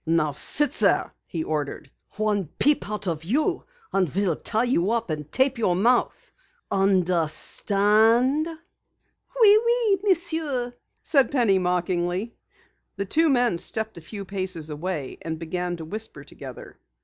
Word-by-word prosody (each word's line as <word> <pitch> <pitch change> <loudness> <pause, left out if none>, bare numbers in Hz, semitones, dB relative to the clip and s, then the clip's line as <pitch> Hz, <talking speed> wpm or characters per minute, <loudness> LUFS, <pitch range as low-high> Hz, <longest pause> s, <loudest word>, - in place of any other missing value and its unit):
"Now 165 -2 +2
sit 280 - +1
there," - - +2
he 165 -2 -3
ordered. 150 -2 -4 0.3
"One 210 -4 0
peep 295 -7 +2
out 210 -1 -4
of 165 -2 -2
you 300 - 0 0.3
and 185 -4 +2
we'll 185 0 0
tie 220 +7 -1
you 225 -7 +1
up 230 -5 -1
and 150 -1 -5
tape 265 -1 +1
your 185 -6 +2
mouth. 235 +7 +1 0.4
Understand?" 200 - +2
"Oui, 405 +6 0
oui, 470 -4 +2
Monsieur," 320 -10 0 0.3
said 275 -5 +3
Penny, 230 -9 +2
mockingly. 180 +3 -1 0.6
The 200 - -3
two 320 - +3
men 245 -9 +2
stepped 220 -2 -3
a - - -15
few 200 +4 -8
paces 185 -5 -4
away 150 -2 -4
and 160 -1 -4
began 175 +2 -3
to 160 - -8
whisper 210 -5 -7
together. - - -11
200 Hz, 135 wpm, -24 LUFS, 175-255 Hz, 0.6 s, said